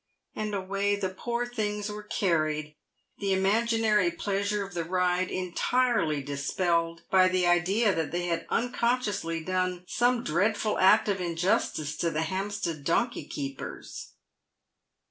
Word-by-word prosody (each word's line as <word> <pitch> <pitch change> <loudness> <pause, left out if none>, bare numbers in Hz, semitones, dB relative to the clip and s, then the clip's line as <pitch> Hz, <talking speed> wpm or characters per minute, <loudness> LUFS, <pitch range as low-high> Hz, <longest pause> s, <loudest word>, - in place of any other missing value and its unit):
And 215 -1 -2
away 200 +1 0
the 200 -2 -2
poor 235 +5 -2
things 210 -4 -2
were 210 0 -5
carried, 155 -7 -1 0.4
the 200 -1 0
imaginary 215 0 +2
pleasure 200 +3 -1
of 195 - -11
the 170 -1 -2
ride 180 +1 +1
entirely 185 - 0
dispelled 165 +4 -1
by 185 -1 +6
the 185 -1 +1
idea 190 +5 +3
that 165 -3 -1
they 175 +1 -1
had 170 -1 -2
unconsciously 235 -9 0
done 185 0 -1
some 245 0 +1
dreadful 205 +6 +1
act 190 - +5
of 195 -2 0
injustice 170 -3 0
to 170 - +1
the 160 0 -1
Hampstead 185 -3 -3
donkey 235 - 0
keepers. 135 -2 -7
185 Hz, 130 wpm, -28 LUFS, 170-210 Hz, 0.4 s, by